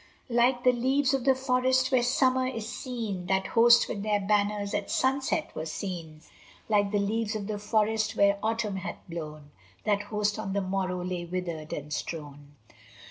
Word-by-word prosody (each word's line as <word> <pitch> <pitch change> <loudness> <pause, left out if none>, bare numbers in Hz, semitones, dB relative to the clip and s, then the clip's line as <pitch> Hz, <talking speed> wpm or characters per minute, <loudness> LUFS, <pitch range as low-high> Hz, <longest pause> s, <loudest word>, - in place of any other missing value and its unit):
Like 245 +1 +3
the 250 - +6
leaves 260 +3 +1
of 265 -2 0
the 265 -1 +5
forest 260 0 +2
when 255 -2 +4
Summer 255 +1 +2
is 230 -3 -5
green, 220 -8 -4
That 190 0 +1
host 235 +1 +5
with 200 - -4
their 210 0 +1
banners 205 0 0
at 205 -1 -2
sunset 270 +4 0
were 160 - -4
seen; 160 -2 -6 0.5
Like 205 -2 +2
the 210 - +1
leaves 215 +2 -1
of 210 -2 -3
the 210 0 -4
forest 215 +1 +1
when 200 -1 +4
Autumn 220 -3 -1
hath 190 - -5
blown, 155 -3 -7 0.3
That 205 -2 +1
host 210 0 -1
on 195 -3 -3
the 200 - +1
morrow 185 -1 -2
lay 180 -1 -3
withered 170 -3 -4
and 150 +1 -5
strown. 145 -2 -6
210 Hz, 175 wpm, -28 LUFS, 185-240 Hz, 0.5 s, the